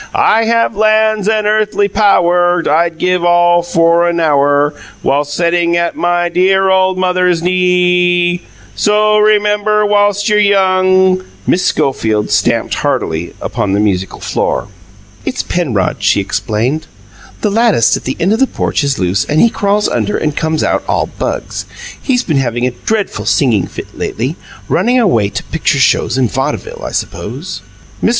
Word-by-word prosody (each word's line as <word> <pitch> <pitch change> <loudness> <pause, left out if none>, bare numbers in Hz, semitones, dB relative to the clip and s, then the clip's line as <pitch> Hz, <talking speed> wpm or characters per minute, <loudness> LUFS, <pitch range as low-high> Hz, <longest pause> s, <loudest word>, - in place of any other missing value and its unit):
"I 225 +1 +3
have 230 -1 +1
lands 215 0 +2
and 215 -1 0
earthly 210 -1 +1
pow 200 -2 +2
wur. 175 0 +1
I'd 165 +1 +1
give 180 0 0
all 175 0 +3
for 170 0 +2
a - - +1
now 160 -4 +1
wur, 145 +1 +2 0.3
Whi - - +1
ilst 145 0 -2
setting 170 0 +1
at 170 0 -1
MY 175 - -2
Y 175 0 +1
Y 175 - -1
dear 190 +2 +2
old 185 0 +2
mother's 180 -2 +1
knee 180 - +1
ee, 180 -1 +2 0.3
So 210 - 0
o 215 0 +3
o - - +3
rem 210 -1 +3
mem 210 0 0
bur 210 0 +2
whilst 205 0 +1
you're 210 -1 +3
young 185 -2 +2
" - - -28
Miss 180 - +1
Schofield 110 -5 0
stamped - - +1
heartily 80 +2 -2
upon 100 -1 -2
the 100 - +1
musical 95 -3 -1
floor. - - -2 0.5
"It's 125 - -3
Penrod," 125 - -1
she - - +2
explained. 125 +9 -2 0.5
"The 210 - 0
lattice 220 - +3
at - - -7
the 130 - -3
end 185 +5 +1
of 225 - -1
the 270 - +3
porch - - -2
is 140 -1 -1
loose, 95 +1 0
and 150 - 0
he 235 - +5
crawls 205 0 0
under 210 - -1
and 150 -2 -2
comes 160 -1 -1
out - - 0
all - - 0
bugs. - - -4 0.3
He's 250 -3 0
been 155 -5 -1
having 120 -2 -1
a 125 - 0
dreadful 210 - -3
singing 115 - +1
fit - - -10
lately 130 +8 -3 0.3
running 240 +8 +1
away 115 - +2
to 100 - -5
picture - - -1
shows 120 - +1
and 125 -4 0
vaudeville, - - -4
I - - -4
suppose." 145 - -5 0.4
Mr. - - +3
175 Hz, 180 wpm, -13 LUFS, 145-205 Hz, 0.5 s, he